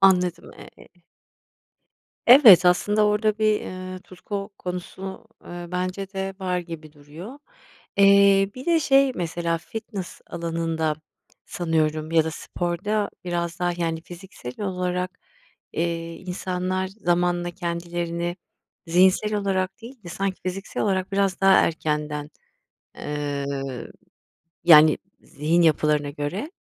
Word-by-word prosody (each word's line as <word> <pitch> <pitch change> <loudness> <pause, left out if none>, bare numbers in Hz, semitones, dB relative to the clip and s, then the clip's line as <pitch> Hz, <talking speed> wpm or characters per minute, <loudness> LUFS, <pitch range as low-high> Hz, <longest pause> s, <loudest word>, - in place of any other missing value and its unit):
Anladım, 180 -3 +3 0.3
eee - - -16 1.4
Evet, 235 - +9
aslında 205 +4 +3
orada 210 +1 +1
bir, 215 -1 +2
eee, 185 0 -7
tutku 200 +2 -6
konusu, 190 +3 -6 0.2
eee, 175 0 -7
bence 185 +2 -3
de 195 0 -3
var 180 -1 -1
gibi 165 -3 -8
duruyor. 160 - -11 0.6
Eee, 200 0 +6
bir 255 +1 -9
de 335 -2 +3
şey 275 -1 +4
mesela 170 -1 -2
fitness 205 -1 -7
alanında 165 -2 -2 0.5
sanıyorum 155 -2 -1
ya 160 -1 +4
da 160 - -2
sporda 195 +6 -2
biraz 170 -1 -2
daha, 175 0 0
yani, 165 -2 -2
fiziksel 175 -6 -10
olarak, 180 -1 -2 0.5
eee, 165 0 -2
insanlar 185 0 -3
zamanla 175 -3 0
kendilerini 170 0 -3 0.5
zihinsel 190 +5 +3
olarak 195 0 -1
değil 240 0 -11
de - - -8
sanki 195 +2 -3
fiziksel 185 +2 -4
olarak 190 -1 0
biraz 195 -1 +1
daha 195 0 +6
erkenden, 150 -2 0 0.7
ııı, 140 -3 -4 0.8
yani, 155 -2 +8 0.2
zihin 160 +4 0
yapılarına 150 -2 +2
göre 160 - -4
180 Hz, 115 wpm, -24 LUFS, 165-195 Hz, 1.4 s, Evet